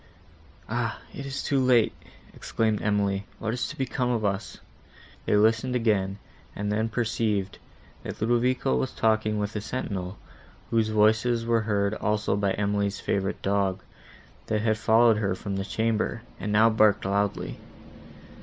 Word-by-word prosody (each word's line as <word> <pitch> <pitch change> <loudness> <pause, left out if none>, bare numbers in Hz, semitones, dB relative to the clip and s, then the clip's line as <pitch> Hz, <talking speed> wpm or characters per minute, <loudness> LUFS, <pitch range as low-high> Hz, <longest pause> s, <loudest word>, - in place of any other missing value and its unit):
"Ah! - - -2
it 140 - -6
is 135 0 -4
too 140 - +1
late!" 125 -4 +4 0.4
exclaimed 110 -2 -1
Emily, 100 -1 0
"what 110 0 -3
is 120 -2 -2
to - - -8
become 130 -1 -1
of 115 -3 0
us?" 100 0 -2 0.7
They - - +3
listened 110 +4 +2
again, 100 -5 +1 0.4
and 105 +1 -2
then 110 +2 0
perceived, 110 -4 -1 0.4
that - - -7
Ludovico 120 - +1
was 65 - -2
talking 110 -1 +1
with 105 +1 -3
a 105 - -2
sentinel, 100 -5 -4 0.5
whose 115 -1 +2
voices 110 +2 +3
were 115 -1 +2
heard 100 -2 0
also 105 -1 0
by 100 -1 +1
Emily's 100 0 -1
favourite 95 0 -2
dog, 100 -1 0 0.6
that 105 -1 0
had 110 -1 +1
followed 115 0 +5
her 100 -3 0
from 100 +1 -5
the 95 - -1
chamber, 115 +2 -1 0.2
and 105 - -3
now 110 +2 +5
barked 110 -3 +3
loudly. 100 +1 -1
110 Hz, 150 wpm, -26 LUFS, 100-115 Hz, 0.7 s, followed